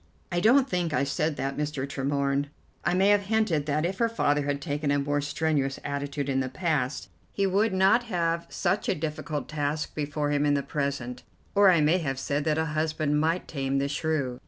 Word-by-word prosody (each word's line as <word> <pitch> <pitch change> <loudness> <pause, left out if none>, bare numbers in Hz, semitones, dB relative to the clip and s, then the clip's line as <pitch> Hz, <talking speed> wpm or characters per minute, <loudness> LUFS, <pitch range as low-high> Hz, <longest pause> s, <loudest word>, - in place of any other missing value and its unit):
"I 175 - +1
don't 250 +8 +5
think 175 - -1
I - - +2
said 150 +2 -1
that, 135 -1 -3
Mr. 150 -2 -2
Tremorne. 140 0 -1 0.4
I 175 +3 +1
may 190 +2 +4
have 205 -1 +3
hinted 205 -9 +1
that 150 +2 +1
if 190 +2 -3
her 230 -1 +3
father 145 -10 +1
had 140 0 -1
taken 145 -1 -2
a 145 - +3
more 145 +1 0
strenuous 145 -2 -1
attitude 140 0 -3
in 135 -1 +1
the 130 -1 -1
past, 150 -3 -1 0.2
he 200 - 0
would 200 +3 +2
not 190 +6 +4
have 170 -5 -1
such 190 +2 -1
a - - +2
difficult 150 -2 -4
task 150 0 -2
before 145 0 -2
him 145 0 +2
in 145 -1 +3
the 140 - 0
present, 140 -3 -3 0.3
or 200 -1 +6
I 170 -4 +5
may 160 +5 +3
have 135 -5 -2
said 145 +2 -2
that 155 -1 +1
a 160 - +1
husband 155 -1 0
might 165 +3 0
tame 135 -2 -2
the 140 0 +1
shrew. 145 -4 -1
150 Hz, 205 wpm, -27 LUFS, 140-170 Hz, 0.4 s, or